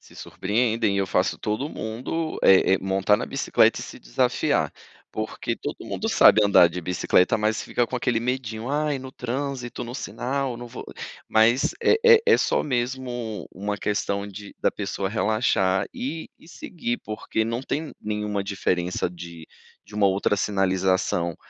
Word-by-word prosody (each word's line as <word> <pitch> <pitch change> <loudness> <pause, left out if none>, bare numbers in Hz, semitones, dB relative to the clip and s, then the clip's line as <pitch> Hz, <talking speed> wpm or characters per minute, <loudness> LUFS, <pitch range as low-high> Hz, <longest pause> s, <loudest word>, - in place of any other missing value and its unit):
Se - - -19
surpreendem. 110 0 0
Eu 100 - +1
faço 90 0 0
todo 110 +7 -2
mundo, 130 +8 -4
eh 95 0 +6
eh, - - 0
montar 95 +2 +2
na - - -4
bicicleta - - +2
e - - -5
se - - -9
desafiar, - - 0 0.4
porque 110 0 -3
todo - - -5
mundo - - -3
sabe 110 - +6
andar 100 -4 +6
de 90 +2 -5
bicicleta, 90 +5 +2
mas 110 +1 0
fica 120 - 0
com 125 - -3
aquele 120 -1 0
medindo: 120 -2 -3
"Ai, 145 0 0
no 130 0 -8
trânsito, 130 -1 -4
no 120 +1 -7
sinal, 135 -1 -3
não 120 - -7
vou". 120 0 -9 0.4
Mas, 115 +4 +3
é 445 - +5
é 470 -1 +9
é - - +6
só - - +1
mesmo 120 - -3
uma 105 +2 -3
questão 100 -1 -1
de 100 0 -10
da - - +3
pessoa 100 -1 -3
relaxar 100 -3 +1
e 155 +5 -5
e - - -19
seguir, 145 -8 -4
porque 110 +1 -2
não 115 +3 -3
tem 150 +3 -3
nenhuma 105 -1 -2
diferença 90 -3 -1
de 85 -2 -10 0.4
de 105 - -15
uma 105 -1 +3
outra 100 +1 +1
sinalização 95 -3 0
110 Hz, 160 wpm, -24 LUFS, 95-125 Hz, 0.4 s, é